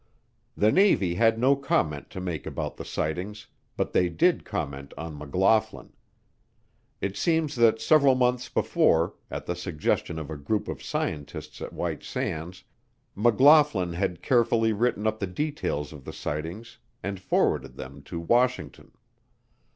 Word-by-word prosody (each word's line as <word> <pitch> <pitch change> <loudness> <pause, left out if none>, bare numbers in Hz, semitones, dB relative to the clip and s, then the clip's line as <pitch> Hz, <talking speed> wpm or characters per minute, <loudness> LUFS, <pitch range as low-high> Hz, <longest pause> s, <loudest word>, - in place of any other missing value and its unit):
The 105 +1 +4
Navy 180 - +4
had 115 +4 +3
no 130 +4 +4
comment 75 - -1
to - - -7
make 90 -4 -4
about - - -4
the - - -6
sightings, 90 +7 -4 0.3
but - - -1
they 90 - +3
did 175 - +2
comment 70 -8 -5
on 80 -1 -6
McLaughlin. 95 +9 0 1.1
It 100 0 -2
seems 160 -3 +1
that 115 -1 +4
several 140 +2 +5
months 125 0 +1
before, 85 +1 +2 0.2
at - - -5
the 90 - -2
suggestion 85 -1 -2
of 80 -1 -6
a 80 - -5
group 105 +9 -2
of - - -5
scientists 75 -2 -4
at - - -5
White - - -3
Sands, 85 +4 -4 0.5
McLaughlin 120 - +5
had 90 0 -2
carefully 115 -2 +3
written 110 -1 0
up 110 0 0
the 100 - -2
details 90 - -3
of 75 -3 -11
the - - -8
sightings 85 +10 -5 0.2
and 100 0 -4
forwarded - - 0
them 70 +2 -9
to 85 - -5
Washington. 120 +9 0
100 Hz, 145 wpm, -26 LUFS, 80-120 Hz, 1.1 s, several